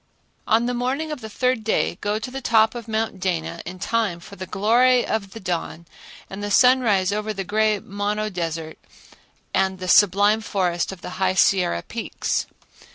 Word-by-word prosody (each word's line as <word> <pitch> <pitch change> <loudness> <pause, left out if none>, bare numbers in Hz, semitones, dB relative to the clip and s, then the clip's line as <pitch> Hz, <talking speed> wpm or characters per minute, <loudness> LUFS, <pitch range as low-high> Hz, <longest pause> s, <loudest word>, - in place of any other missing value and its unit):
On 225 +2 +3
the 245 - -1
morning 265 +6 -2
of 300 - -5
the 220 - -7
third 250 +1 0
day 220 - 0
go 205 +1 0
to 220 +4 -6
the 270 +1 -5
top 220 -2 +3
of 235 -2 -8
Mount 220 -3 -2
Dana 170 -3 -2
in 180 +1 -7
time 205 -2 -1
for 170 - -12
the 185 0 -7
glory 240 +5 +3
of 205 -3 -2
the 225 - -8
dawn 170 -3 -4 0.4
and 195 +1 -8
the 205 - -3
sunrise 220 -5 +4
over 215 +1 -2
the 195 -1 -4
gray 215 +2 +1
Mono 205 +2 -3
Desert 165 -3 -4 0.7
and 190 0 +1
the 185 0 -6
sublime 205 +3 +5
forest 180 -5 -1
of 185 -2 -11
High 185 +1 -1
Sierra 180 - +2
peaks. - - -3
205 Hz, 175 wpm, -23 LUFS, 185-225 Hz, 0.7 s, sublime